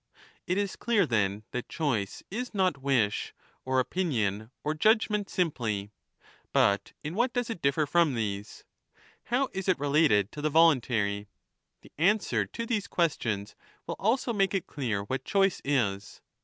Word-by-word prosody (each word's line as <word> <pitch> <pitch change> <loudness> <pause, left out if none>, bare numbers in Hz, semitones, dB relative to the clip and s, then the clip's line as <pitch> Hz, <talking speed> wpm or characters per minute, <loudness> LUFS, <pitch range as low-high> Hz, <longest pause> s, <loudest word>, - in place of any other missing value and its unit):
It 180 - +1
is 200 -1 -1
clear, 230 -4 +2
then, 105 -3 0
thatcHbice 125 -4 -2
is 245 +2 -4
not 185 -7 +1
wish, 125 -7 0 0.3
or 130 0 +1
opinion, 115 - -1
or 150 - 0
judge 215 +8 +3
ment 205 -2 -1
simply. 110 - -1 0.6
But 100 0 +2
in 150 +2 -4
what 240 +5 +1
does 245 -1 -1
it 180 - -6
differ 140 +2 +2
from 165 -2 +2
these? 105 -2 -4 0.6
How 255 +3 +1
is 190 0 -3
it 185 - +3
related 140 -9 +3
to 150 - -7
the 155 - +1
voluntary? 120 -10 +3 0.5
The - - -17
answer 200 +5 +2
to 230 - -5
these 220 -4 -1
ques 170 -3 +1
tions 105 -2 -3 0.3
will - - -3
also 235 +4 +1
make 195 -2 +1
it 190 - -1
clear 115 -8 -2
what 130 +5 -3
choice 195 +3 +2
is. 105 -8 -1
150 Hz, 155 wpm, -28 LUFS, -, 0.6 s, judge